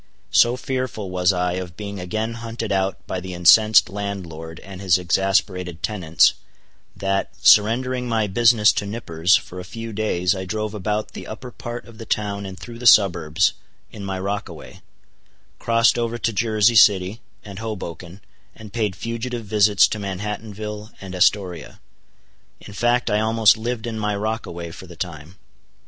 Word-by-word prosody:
So 120 +1 +4
fearful 130 -7 -4
was 90 0 +2
I 90 -1 -1
of 90 -2 -9
being 100 -2 -6
again 110 +5 -3
hunted 115 -1 -5
out 95 0 -1
by 95 - -3
the 90 0 -7
incensed 105 +5 +6
landlord 90 -6 -6
and 95 0 -10
his 95 -3 +3
exasperated 90 -1 0
tenants, 90 -7 +3 0.6
that, 95 0 -1 0.2
surrendering 125 +4 +4
my 110 -2 +1
business 115 +1 +4
to 100 - -3
Nippers, 95 -5 +1
for 90 - -4
a - - -6
few 115 +5 -7
days 90 -4 0
I 95 - -4
drove 110 +2 -3
about 105 +1 -2
the - - -9
upper 125 +3 -8
part 120 0 -7
of 115 -2 -15
the 115 - -9
town 100 -1 -2
and 95 0 -9
through 115 +3 -10
the 125 - 0
suburbs, 85 -8 +4 0.4
in 105 - -9
my 95 -1 -3
rockaway; 100 +2 -6 0.8
crossed 115 +1 +3
over 120 0 -2
to 115 -1 -1
Jersey 110 +1 +2
City 100 +1 +4 0.2
and 100 -1 -9
Hoboken, 95 -4 -7 0.3
and 105 -2 -12
paid 105 -5 -1
fugitive 115 +2 -5
visits 105 -1 +4
to 110 - -4
Manhattanville 105 +2 -5
and 95 -1 -9
Astoria. 90 -1 0 0.8
In 100 - -12
fact 120 +2 +1
I 105 - +2
almost 110 -2 +4
lived 115 +1 -4
in 115 -2 -4
my 105 -1 -1
rockaway 100 -5 -4
for 95 - -11
the 85 - -12
time. 85 0 -7
105 Hz, 160 wpm, -22 LUFS, 95-110 Hz, 0.8 s, incensed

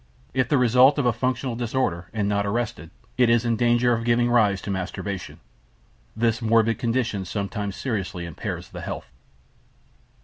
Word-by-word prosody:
If 130 0 +1
the 145 - +3
result 125 +3 +5
of 140 - +1
a 120 - +3
functional 125 +1 -1
disorder, 115 -8 -2
and 105 -3 -1
not 100 0 +1
arrested, 105 -5 -3 0.3
it 125 -2 +5
is 120 0 +3
in 115 -1 +2
danger 120 +1 +3
of 115 0 -1
giving 120 0 +2
rise 105 -5 +3
to 100 - -3
masturbation. 95 0 -5 0.8
This 115 +1 +1
morbid 115 0 +2
condition 115 -4 -1
sometimes 100 +1 -4
seriously 95 -7 -3
impairs 85 -3 -6
the - - -8
health. - - -6
115 Hz, 160 wpm, -24 LUFS, 100-120 Hz, 0.8 s, result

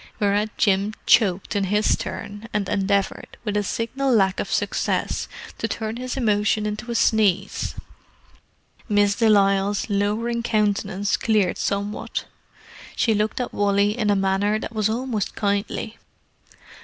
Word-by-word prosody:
Whereat 205 +1 0
Jim 200 +1 +2
choked 200 -2 +3
in 200 -1 +1
his 210 +3 +2
turn, 205 +3 -7
and 205 -2 0
endeavoured, 200 0 -1
with 210 -2 0
signal 260 +6 -1
lack 195 -5 +3
of - - -3
success, - - -1 0.3
to - - -1
turn 220 0 -4
his 255 +2 -4
emotion 210 -3 +1
into 210 +3 -4
a 235 - -2
sneeze. 205 -4 +1 1.1
Miss 205 -1 +3
de 225 +1 +2
Lisle's 200 0 +2
lowering 215 +4 0
countenance 205 -3 0
cleared 210 -5 +1
somewhat. 200 +1 -2 0.7
She 225 - +2
looked 210 +3 0
at 250 - -3
Wally 205 +1 +2
in 215 -4 0
a 205 - +4
manner 195 +2 +1
that 220 - -6
was 215 -1 +1
almost 230 -3 -2
kindly. 205 +2 -2
210 Hz, 135 wpm, -23 LUFS, 200-220 Hz, 1.1 s, a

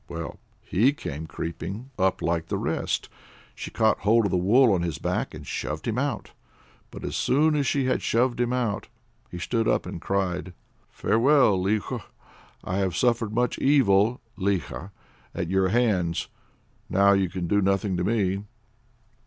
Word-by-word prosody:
Well, 85 -1 -6 0.2
he 120 +9 +2
came 80 - -6
creeping 95 +11 -6
up 95 0 +1
like 85 -1 0
the - - -2
rest. - - -2 0.5
She - - -7
caught 110 -1 +2
hold 110 +2 +3
of 100 - 0
the - - +1
wool 110 +6 +4
on 90 - +1
his 85 -3 -2
back - - -2
and - - -9
shoved 75 +1 -4
him 115 +2 0
out. 140 -5 -2 0.6
But - - -10
as - - -4
soon 150 +3 +2
as 140 -2 +1
she 140 -2 +1
had 130 - +1
shoved 120 +1 +1
him 120 0 +1
out, 120 -5 -1 0.4
he - - -7
stood 115 +6 -1
up - - +1
and - - -6
cried: 95 -2 -2 0.4
"Farewell, 130 -1 +3
Likho! 105 +2 -1 0.6
I 95 - -2
have 95 -3 0
suffered 120 -3 +1
much 125 +3 0
evil 120 -5 +3 0.2
(likha) 95 -1 -2 0.5
at 85 0 -3
your 95 0 +3
hands. 95 -6 +1 0.6
Now 100 +1 +5
you 95 -2 +2
can 90 0 -4
do 100 +4 +2
nothing 95 0 +1
to 90 - -1
me." 100 -2 0
100 Hz, 165 wpm, -25 LUFS, 90-120 Hz, 0.6 s, Now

